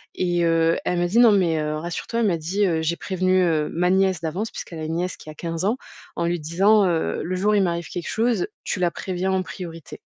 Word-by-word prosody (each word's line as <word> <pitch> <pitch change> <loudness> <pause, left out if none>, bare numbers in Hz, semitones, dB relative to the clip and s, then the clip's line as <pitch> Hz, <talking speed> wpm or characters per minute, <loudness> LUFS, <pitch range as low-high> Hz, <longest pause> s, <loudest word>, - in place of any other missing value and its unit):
et 175 -1 0
heu, 165 0 +3
elle 180 -1 0
me 175 - +1
dit: 225 +7 +2
«Non 235 -3 +7
mais, 175 -5 +2
heu, 150 0 -2
rassure 170 +2 -5
toi» 230 - -2
elle 225 - +3
m'a 175 - +2
dit, 185 +6 0
heu: 165 -4 +1
«J'ai 170 +2 -1
prévenu, 185 0 +1
heu, 155 -3 +1
ma 180 +2 +1
nièce 190 -2 +2
d'avance» 180 +8 -3
puisqu'elle 165 - -7
a 155 - -5
une 160 +1 -3
nièce 180 +1 -2
qui - - -12
a 155 - -7
15 165 0 -4
ans 220 +6 +1 0.4
«en 170 - 0
lui 175 0 0
disant, 195 +6 +4
heu: 170 -3 0
"Le 185 +2 -2
jour 205 +3 +2
où 210 - +3
il 200 - +4
m'arrive 170 -2 -1
quelque 175 - -5
chose, 240 - +1 0.2
tu - - -2
la 175 -1 +2
préviens 190 0 -3
en 190 0 +1
priorité"». 165 -4 -8
175 Hz, 260 wpm, -23 LUFS, 165-190 Hz, 0.4 s, Non